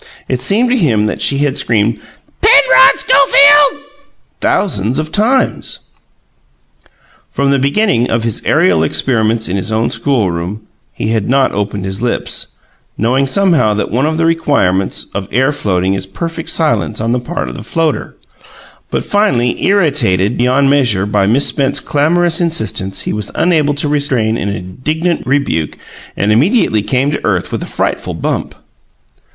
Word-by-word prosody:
It 130 -1 -2
seemed 235 - +2
to - - +3
him 115 - +1
that 105 - -3
she 140 - +2
had 140 -2 0
screamed 110 0 0 0.4
"Penrod - - +5
Schofield!" 285 - +4 0.6
thousands 120 - -1
of 155 0 -3
times. 245 +7 0 1.5
From 140 0 0
the 140 - +2
beginning 140 - +1
of 115 0 -1
his 115 -2 -2
aerial 90 -4 +2
experiments 110 - 0
in 95 - -2
his 95 +3 -4
own 110 +1 0
schoolroom, 105 -6 -1 0.3
he 105 - -4
had 110 -2 -1
not 135 0 +2
opened 100 -1 -4
his 95 +2 -4
lips, 120 -1 -3 0.4
knowing 130 +5 0
somehow 165 - +2
that 105 - -3
one 130 +6 0
of 160 0 -2
the 165 - +1
requirements 140 - 0
for 95 -1 -5
air 130 +4 +1
floating 95 -10 -1
is 95 -1 -3
perfect 165 - -5
silence 155 -8 0
on 115 +2 -2
the 125 - 0
part 100 - -5
of 60 - -6
the - - -8
floater; 155 +6 -2 0.7
but, - - -3
finally, 135 - 0
irritated 140 - +1
beyond 130 +3 +1
measure 125 -9 +2
by 100 -1 0
Miss 125 +7 +2
Spence's 140 0 +1
clamorous 165 +5 +1
insistence, 110 - 0
he - - -4
was 105 -1 -4
unable 155 -5 +1
to 145 +1 0
restrain 140 -7 0
an 100 - -3
indignant 130 - -3
rebuke 125 - -1 0.4
and 100 +2 0
immediately 125 - +2
came 130 +6 -1
to 150 - -4
earth 95 -4 -1
with - - -4
a - - -5
frightful - - -3
bump. - - -3
125 Hz, 155 wpm, -13 LUFS, 105-155 Hz, 1.5 s, Penrod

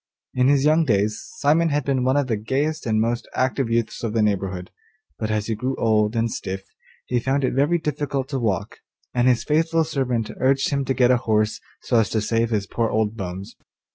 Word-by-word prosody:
In 125 0 +2
his 140 0 +3
young 155 +2 +4
days 105 -5 +1 0.2
Simon 160 +4 +3
had 145 -1 0
been 135 -2 +1
one 130 +2 +2
of 145 - +2
the 120 -3 0
gayest 140 +8 -2
and 110 -1 +2
most 115 +2 -1
active 130 -1 0
youths 115 -1 -1
of 115 -2 -2
the 115 -2 +2
neighbourhood, 95 -3 -2 0.5
but 110 - -2
as 105 -1 0
he 115 - -1
grew 125 +5 -2
old 110 0 +1
and 115 0 0
stiff 95 +1 -5 0.4
he 125 - 0
found 135 +3 0
it 130 - +1
very 145 +6 +2
difficult 145 -4 -2
to 135 -3 -2
walk, 110 -5 -2 0.3
and 120 0 +2
his 125 -2 +3
faithful 165 +2 +2
servant 130 -7 -1
urged 135 +2 +2
him 140 -1 0
to 135 - -1
get 125 0 +4
a 125 - +4
horse 110 -3 0 0.2
so 120 - +2
as 105 -4 +1
to 110 - 0
save 115 +1 0
his 105 -3 0
poor 115 +3 -1
old 110 0 0
bones. 95 -1 -6
120 Hz, 215 wpm, -23 LUFS, 110-140 Hz, 0.5 s, young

